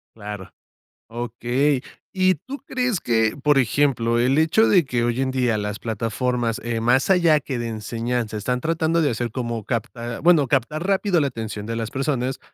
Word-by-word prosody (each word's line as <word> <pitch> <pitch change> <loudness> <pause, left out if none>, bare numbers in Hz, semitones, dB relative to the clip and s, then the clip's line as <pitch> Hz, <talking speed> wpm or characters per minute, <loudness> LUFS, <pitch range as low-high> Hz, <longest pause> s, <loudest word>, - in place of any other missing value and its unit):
Claro. 105 -3 -8 0.6
Okey. 120 +4 -1 0.3
¿Y 185 -1 +3
tú 265 - -8
crees 250 -7 -1
que, 110 -2 +1
por 145 0 +2
ejemplo, 125 -2 +2
el 130 +4 +2
hecho 160 +8 +4
de 180 -6 +4
que 120 -3 -1
hoy 120 +1 0
en 135 - 0
día 125 -4 +1
las 105 0 -3
plataformas, 115 +1 -2
eh, 120 -1 -2
más 120 +8 +2
allá 170 -5 +5
que 130 -3 -4
de 120 - -3
enseñanza, 115 0 -3
están 125 +4 -2
tratando 165 +1 +1
de 145 - +2
hacer 120 0 -3
como, 120 -3 -3
capt 115 -1 -1
ah, 115 0 -5
bueno, 165 -5 +5
captar 150 +8 0
rápido 195 -2 +2
la 145 - +2
atención 110 -4 -5
de 115 - -4
las 115 -1 -3
personas. 135 -2 -1
125 Hz, 180 wpm, -22 LUFS, 115-150 Hz, 0.6 s, allá